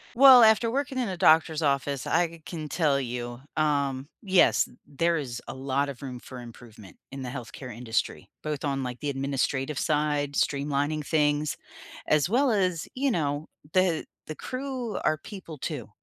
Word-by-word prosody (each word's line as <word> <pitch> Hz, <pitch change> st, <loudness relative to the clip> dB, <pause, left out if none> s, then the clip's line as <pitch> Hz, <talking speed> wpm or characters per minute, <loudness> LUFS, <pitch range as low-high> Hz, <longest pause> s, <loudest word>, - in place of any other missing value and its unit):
Well, 260 Hz, -2 st, +9 dB
after 220 Hz, +1 st, +5 dB
working 270 Hz, +1 st, -2 dB
in 245 Hz, -, 0 dB
a 185 Hz, -, -3 dB
doctor's 160 Hz, -1 st, +4 dB
office, 140 Hz, -2 st, 0 dB
I 170 Hz, -1 st, 0 dB
can 155 Hz, -3 st, -5 dB
tell 145 Hz, -4 st, +2 dB
you, 120 Hz, -1 st, -5 dB, 0.2 s
um, 140 Hz, -3 st, 0 dB
yes, 190 Hz, -3 st, +4 dB
t -, -, -15 dB
there 165 Hz, +4 st, +1 dB
is 125 Hz, -6 st, -4 dB
a -, -, -5 dB
lot 135 Hz, +2 st, -1 dB
of 140 Hz, -2 st, -8 dB
room 130 Hz, -2 st, -6 dB
for 125 Hz, +1 st, -10 dB
improvement 115 Hz, -4 st, -13 dB, 0.2 s
in 135 Hz, -1 st, -6 dB
the 130 Hz, -, -5 dB
health 120 Hz, -3 st, -7 dB
care 130 Hz, -, -8 dB
industry, 115 Hz, 0 st, -3 dB
both 150 Hz, -2 st, -4 dB
on, 135 Hz, -2 st, -1 dB
like, 125 Hz, -1 st, -5 dB
the 145 Hz, -, -1 dB
administrative 135 Hz, +1 st, -1 dB
side, 150 Hz, -2 st, 0 dB
streamlining 145 Hz, +2 st, 0 dB
things, 150 Hz, -1 st, +1 dB, 0.5 s
as 155 Hz, +1 st, +3 dB
well 255 Hz, +6 st, +3 dB
as, 185 Hz, -6 st, 0 dB
you 275 Hz, +1 st, +1 dB
know, 150 Hz, -, -1 dB, 0.3 s
the 185 Hz, -4 st, +2 dB, 0.2 s
the 155 Hz, -, -5 dB
crew 255 Hz, -, -4 dB
are 155 Hz, -, +2 dB
people 170 Hz, -2 st, -9 dB
too. 135 Hz, -4 st, -5 dB
145 Hz, 170 wpm, -27 LUFS, 135-170 Hz, 0.5 s, Well